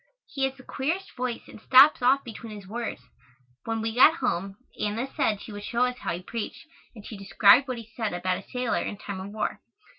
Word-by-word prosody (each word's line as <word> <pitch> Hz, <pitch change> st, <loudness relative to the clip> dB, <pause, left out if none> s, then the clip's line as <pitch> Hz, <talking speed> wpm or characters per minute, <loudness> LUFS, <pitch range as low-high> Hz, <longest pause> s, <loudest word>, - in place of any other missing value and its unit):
He 280 Hz, -2 st, -2 dB
has 265 Hz, 0 st, -3 dB
the 260 Hz, -, -14 dB
queerest 330 Hz, +11 st, -3 dB
voice 250 Hz, -2 st, -4 dB
and -, -, -13 dB
stops 265 Hz, +5 st, +7 dB
off 265 Hz, +3 st, +4 dB
between 225 Hz, -2 st, -9 dB
his 205 Hz, -2 st, -10 dB
words. 230 Hz, +3 st, -5 dB, 0.6 s
When 225 Hz, -1 st, -2 dB
we 225 Hz, 0 st, -2 dB
got 270 Hz, +7 st, +7 dB
home 195 Hz, -5 st, -2 dB, 0.2 s
Anna 210 Hz, +4 st, -1 dB
said 210 Hz, -2 st, +1 dB
she -, -, -9 dB
would 205 Hz, 0 st, -8 dB
show 240 Hz, +3 st, +1 dB
us 250 Hz, 0 st, -4 dB
how -, -, -2 dB
he 175 Hz, -, -8 dB
preached 230 Hz, -, -6 dB, 0.3 s
and 215 Hz, -2 st, -12 dB
she 220 Hz, -, -8 dB
described 200 Hz, +6 st, +5 dB
what 255 Hz, -1 st, -3 dB
he 230 Hz, -, -8 dB
said 220 Hz, -3 st, -2 dB
about 180 Hz, +1 st, -1 dB
a -, -, -26 dB
sailor 250 Hz, -2 st, -1 dB
in 205 Hz, -, -4 dB
time 200 Hz, -1 st, -6 dB
of 190 Hz, +1 st, -7 dB
war. 215 Hz, -, -3 dB
230 Hz, 220 wpm, -26 LUFS, 205-255 Hz, 0.6 s, stops